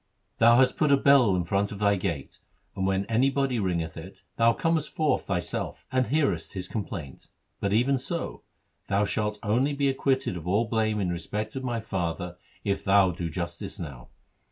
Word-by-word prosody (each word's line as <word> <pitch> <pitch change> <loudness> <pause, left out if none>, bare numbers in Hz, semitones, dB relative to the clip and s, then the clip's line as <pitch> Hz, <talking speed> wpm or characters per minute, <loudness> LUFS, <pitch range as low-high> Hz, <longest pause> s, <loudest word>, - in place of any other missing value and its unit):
Thou 115 +1 +7
hast 130 0 +4
put 150 -2 +3
a 140 - +6
bell 135 -8 +5
in 90 - 0
front 100 +4 0
of 100 - -6
thy 100 0 +3
gate, 85 -8 -4 0.4
and, 95 -1 -1
when 95 +1 +1
anybody 130 +3 +1
ringeth 85 -5 -1
it, 85 +4 -10
thou 115 0 +5
comest 160 +3 0
forth 155 -2 0
thyself 90 -3 -3
and 130 -1 +1
hearest 150 +1 0
his 90 -3 -3
complaint. 90 - -6 0.3
But 100 - -1
even 125 +5 +3
so, 170 +6 -3 0.5
thou 100 +1 +2
shalt 105 +1 -1
only 125 +7 +1
be 140 -1 +1
acquitted 135 -4 0
of 85 0 -8
all 105 +6 +2
blame 110 -1 0
in 95 -3 0
respect 105 +6 -4
of 135 - -4
my 120 -3 -2
father, 90 -3 -3 0.3
if 100 -1 -1
thou 95 -1 +5
do 85 -1 -4
justice 85 +2 -5
now. 70 -7 -8
105 Hz, 180 wpm, -27 LUFS, 90-130 Hz, 0.5 s, Thou